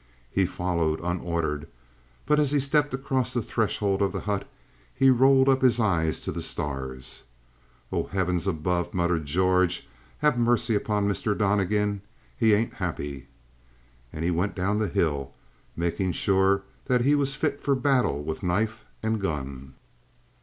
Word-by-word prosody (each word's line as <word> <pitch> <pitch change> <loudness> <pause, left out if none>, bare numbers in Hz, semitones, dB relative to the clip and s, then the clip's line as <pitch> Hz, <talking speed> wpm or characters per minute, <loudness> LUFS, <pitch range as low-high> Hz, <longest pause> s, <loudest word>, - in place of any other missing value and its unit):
He 95 -2 +2
followed, 85 -4 -1
unordered, 85 -3 -2 0.6
but 150 - +3
as 145 -2 +3
he 145 0 +2
stepped 145 +2 +2
across 130 -2 -1
the 120 - +1
threshold 100 -3 0
of 100 - +2
the - - -3
hut 100 -1 -3 0.5
he 135 0 +5
rolled 130 +1 +5
up 135 -1 +4
his 125 -2 +4
eyes 85 -8 +1
to - - -3
the - - -4
stars. 65 -3 -4 0.7
"Oh, - - -1
heavens 90 -1 -1
above," 90 +2 -1
muttered 85 -4 0
George, 90 0 +2 0.3
"have 150 -5 +2
mercy 120 -1 +2
on 105 -2 +1
Mr. 100 +1 0
Donnegan. 105 0 +1 0.3
He 110 - +4
ain't 115 +3 -1
happy." 70 -8 -5 0.8
And 80 +1 -4
he 90 - +2
went 90 +4 -1
down 100 +3 0
the 110 - +1
hill, 70 -9 -1 0.4
making 85 +2 -1
sure 95 0 +2 0.2
that 125 -2 +2
he 140 +4 +3
was 140 -2 +1
fit 145 -1 -1
for 140 - +2
battle 125 - +1
with 80 +4 -4
knife 110 +5 -1 0.2
and 110 -1 0
gun. 70 -6 -4
95 Hz, 155 wpm, -26 LUFS, 85-120 Hz, 0.8 s, he